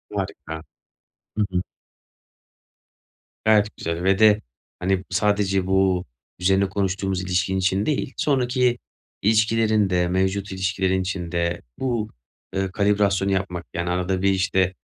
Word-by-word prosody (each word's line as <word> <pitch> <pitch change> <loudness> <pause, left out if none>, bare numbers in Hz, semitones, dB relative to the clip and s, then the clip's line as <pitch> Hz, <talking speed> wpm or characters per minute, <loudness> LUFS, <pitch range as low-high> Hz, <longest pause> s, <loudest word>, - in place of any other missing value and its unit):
Harika. 80 0 -5 0.7
Hı 105 - +3
hı. 90 0 0 1.8
Gayet 105 -1 +3
güzel 85 +1 -3
ve 95 +1 +3
de, 110 -1 +6 0.4
hani, 95 0 0
sadece 100 -3 +1
bu 95 -1 +2 0.3
üzerine 95 +2 +2
konuştuğumuz 95 -1 -1
ilişkin 90 +1 0
için 95 +2 +1
değil, 145 -3 -1
sonraki 125 -3 +2 0.4
ilişkilerin 110 -1 +3
de, 90 -1 +2
mevcut 95 +2 0
ilişkilerin 95 0 0
için 90 -2 -4
de 85 0 -1 0.2
bu, 120 -5 -1 0.5
ııı, 95 -1 -1
kalibrasyonu 100 -1 +2
yapmak, 90 -2 -2
yani, 85 +1 -2
arada 90 +1 0
bir 100 - +3
işte 95 -1 +1
95 Hz, 120 wpm, -23 LUFS, 90-105 Hz, 1.8 s, de